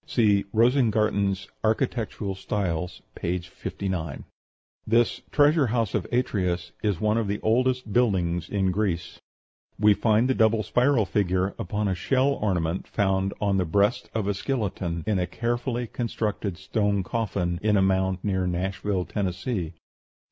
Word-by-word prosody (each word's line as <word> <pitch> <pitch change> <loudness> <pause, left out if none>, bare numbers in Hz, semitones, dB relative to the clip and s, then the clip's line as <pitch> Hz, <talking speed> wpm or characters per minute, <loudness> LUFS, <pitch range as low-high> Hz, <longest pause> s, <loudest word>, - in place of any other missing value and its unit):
(See 105 -4 +3
"Rosengarten's 110 -5 +2 0.2
Architectural 110 -3 -1
Styles," 90 -3 -3
p. 90 +2 -2
59.) 85 -2 -5 0.6
This 115 +1 +2
Treasure 145 -1 +4
House 115 -2 0
of - - -1
Atreus 90 -8 0
is 100 -5 0
one 105 +1 +2
of 110 - -1
the 100 +1 -2
oldest 125 0 +1
buildings 90 -8 +1
in 95 -2 +1
Greece. 90 -4 -2 0.6
We 105 0 +5
find 110 +3 +2
the 130 - +2
double 110 -2 +3
spiral 125 -2 +2
figure 95 -1 0
upon 105 0 -1
a 95 - +1
shell 130 +9 +1
ornament 90 -9 -1
found 95 -1 0
on 100 -2 +1
the 95 - +2
breast 100 +7 +1
of 110 -3 0
a 100 - +1
skeleton, 95 - -2
in 105 -3 +1
a 90 - 0
carefully 120 +4 -2
constructed 105 -5 -3
stone 100 0 0
coffin, 95 -6 -2
in 105 -1 +3
a - - +4
mound 95 -1 +2
near 95 -3 0
Nashville, 95 +1 -1
Tennessee. 95 -2 -3
100 Hz, 140 wpm, -26 LUFS, 95-115 Hz, 0.6 s, We